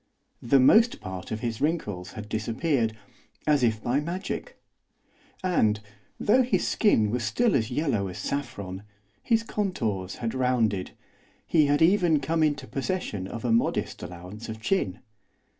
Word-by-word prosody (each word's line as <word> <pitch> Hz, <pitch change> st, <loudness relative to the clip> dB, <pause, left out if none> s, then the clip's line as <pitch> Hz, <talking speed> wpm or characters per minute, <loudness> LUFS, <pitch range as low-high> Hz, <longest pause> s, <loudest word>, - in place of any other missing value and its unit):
The 135 Hz, +3 st, +4 dB
most 225 Hz, -, +5 dB
part 95 Hz, -1 st, -7 dB
of 110 Hz, 0 st, -4 dB
his 115 Hz, -2 st, -3 dB
wrinkles 105 Hz, -, -2 dB
had 105 Hz, -1 st, -7 dB
disappeared, 115 Hz, +2 st, -1 dB, 0.5 s
as 150 Hz, -2 st, +3 dB
if 110 Hz, -3 st, +1 dB
by 125 Hz, +4 st, +1 dB
magic. 170 Hz, +6 st, -5 dB, 0.8 s
And, 110 Hz, -, +2 dB, 0.4 s
though 250 Hz, +5 st, +4 dB
his 250 Hz, 0 st, +1 dB
skin 110 Hz, -, +3 dB
was 120 Hz, 0 st, -1 dB
still 235 Hz, -, +2 dB
as 110 Hz, -4 st, +1 dB
yellow 125 Hz, -7 st, 0 dB
as 90 Hz, -, -7 dB
saffron, 100 Hz, -9 st, -4 dB, 0.4 s
his 230 Hz, -2 st, +2 dB
contours 115 Hz, -, -2 dB
had 115 Hz, -1 st, -3 dB
rounded, 120 Hz, -7 st, +1 dB, 0.6 s
he 155 Hz, -3 st, +3 dB
had 145 Hz, +2 st, +3 dB
even 175 Hz, -3 st, +4 dB
come 160 Hz, +3 st, 0 dB
into 145 Hz, -3 st, +1 dB
possession 135 Hz, -, -3 dB
of 115 Hz, +4 st, -6 dB
a 120 Hz, -, +1 dB
modest 115 Hz, -, 0 dB
allowance 90 Hz, +6 st, -8 dB
of 110 Hz, 0 st, -6 dB
chin. 110 Hz, -, -1 dB
125 Hz, 145 wpm, -27 LUFS, 105-160 Hz, 0.8 s, most